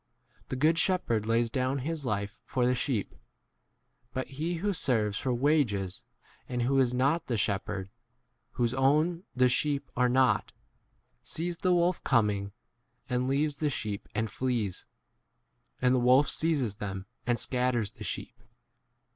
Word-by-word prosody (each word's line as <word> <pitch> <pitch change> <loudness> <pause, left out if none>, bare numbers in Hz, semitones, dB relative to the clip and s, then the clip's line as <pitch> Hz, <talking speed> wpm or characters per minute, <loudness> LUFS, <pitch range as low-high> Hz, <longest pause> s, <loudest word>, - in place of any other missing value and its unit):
The - - -2
good 155 +5 +3
shepherd 120 - +1
lays 115 0 +2
down 130 +1 0
his 155 -4 -2
life 100 -1 -3
for 125 - -1
the 125 - +4
12 125 - 0
sheep: 120 -8 -2 1.0
but 130 - -2
he 155 +5 -2
who 200 +5 -1
serves 110 - 0
for 130 - -1
wages, 120 - +1 0.5
and 125 -1 -1
who 135 +2 +2
is 125 -2 +3
not 140 +7 +1
the 120 - 0
shep 100 -1 0
herd, 95 -2 -4 0.7
whose 120 0 0
own 155 +7 +2
the 125 0 +5
sheep 140 +2 0
are 125 0 +3
not, 125 -3 +2 0.7
sees 170 +1 -3
the 185 - +1
wolf 175 +1 +2
coming, 105 -6 +1 0.6
and 125 +1 +1
•leaves 140 +1 0
the 150 - +1
sheep 105 -7 -4
and 110 +1 -1
flees; 120 -8 -2 0.9
and 125 0 +3
the 130 - +3
wolf 130 +4 +5
seizes 140 -11 0
them 95 -2 -5 0.2
and 120 -1 +2
scatters 125 -5 0
13 - - -30
the - - -6
sheep. - - -5
125 Hz, 155 wpm, -29 LUFS, 115-145 Hz, 1.0 s, the